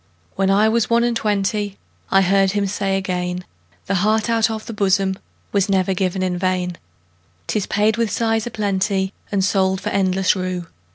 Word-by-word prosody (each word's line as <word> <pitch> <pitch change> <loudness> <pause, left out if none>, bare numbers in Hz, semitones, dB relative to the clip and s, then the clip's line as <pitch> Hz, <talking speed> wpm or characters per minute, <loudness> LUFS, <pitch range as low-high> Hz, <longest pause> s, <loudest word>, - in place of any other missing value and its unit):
When 195 0 +1
I 205 +3 +4
was 230 0 +1
one 235 0 +3
and 240 -1 +1
twentyI 205 -1 -1 0.4
heard 195 0 +4
him 205 -1 +1
say 195 0 -1
again,'The 180 - -5
heart 215 +2 +2
out 225 0 +3
of 220 -1 -5
the 230 - -6
bosomWas 195 0 -1
never 190 -1 +2
given 185 0 -1
in 180 -1 -1
vain;'Tis 90 - -4
paid 215 +2 +2
with 230 -2 +1
sighs 225 +1 0
a - - -2
plentyAnd 195 -2 -1
sold 190 -1 +2
for 200 +2 -3
endless 190 -1 +2
rue. 185 -2 -3
195 Hz, 155 wpm, -20 LUFS, 185-210 Hz, 0.4 s, I